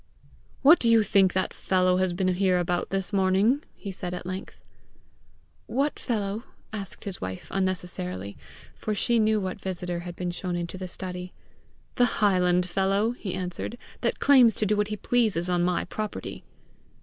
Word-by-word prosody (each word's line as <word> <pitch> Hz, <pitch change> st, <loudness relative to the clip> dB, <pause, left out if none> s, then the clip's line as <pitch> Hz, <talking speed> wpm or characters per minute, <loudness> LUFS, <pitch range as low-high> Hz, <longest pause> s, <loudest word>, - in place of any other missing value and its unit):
"What 310 Hz, +5 st, +8 dB
do 235 Hz, -, +2 dB
you 225 Hz, -1 st, +6 dB
think 195 Hz, -2 st, +4 dB
that 185 Hz, 0 st, 0 dB
fellow 185 Hz, -1 st, +2 dB
has 185 Hz, -1 st, +1 dB
been 185 Hz, +1 st, +1 dB
here 185 Hz, 0 st, +2 dB
about 175 Hz, 0 st, -1 dB
this 195 Hz, +1 st, -2 dB
morning?" 195 Hz, +8 st, +3 dB
he 200 Hz, -, -6 dB
said 180 Hz, -1 st, -5 dB
at 180 Hz, -, -7 dB
length. 185 Hz, +2 st, -6 dB, 1.1 s
"What 280 Hz, +3 st, 0 dB
fellow?" 210 Hz, -2 st, -2 dB, 0.3 s
asked 200 Hz, -4 st, -5 dB
his 200 Hz, -4 st, -6 dB
wife 95 Hz, 0 st, -5 dB
unnecessarily, 175 Hz, -, -2 dB, 0.4 s
for 215 Hz, -, -3 dB
she 235 Hz, +3 st, +2 dB
knew 215 Hz, 0 st, +3 dB
what 190 Hz, 0 st, -4 dB
visitor 180 Hz, -2 st, -3 dB
had 175 Hz, 0 st, -7 dB
been 180 Hz, 0 st, -3 dB
shown 180 Hz, 0 st, -3 dB
into 175 Hz, +1 st, -4 dB
the 185 Hz, -, -4 dB
study. 180 Hz, 0 st, -6 dB, 0.6 s
"The 245 Hz, -2 st, +3 dB
highland 180 Hz, -3 st, +3 dB
fellow," 195 Hz, +4 st, +1 dB
he 205 Hz, -7 st, -5 dB
answered, 185 Hz, +5 st, -4 dB, 0.2 s
"that -, -, 0 dB
claims 255 Hz, -6 st, +6 dB
to 215 Hz, -, 0 dB
do 210 Hz, +1 st, +2 dB
what 210 Hz, 0 st, +1 dB
he 210 Hz, 0 st, -4 dB
pleases 215 Hz, -7 st, +1 dB
on 180 Hz, -1 st, +1 dB
my 175 Hz, 0 st, +1 dB
property!" 215 Hz, -1 st, -5 dB
190 Hz, 170 wpm, -27 LUFS, 180-210 Hz, 1.1 s, What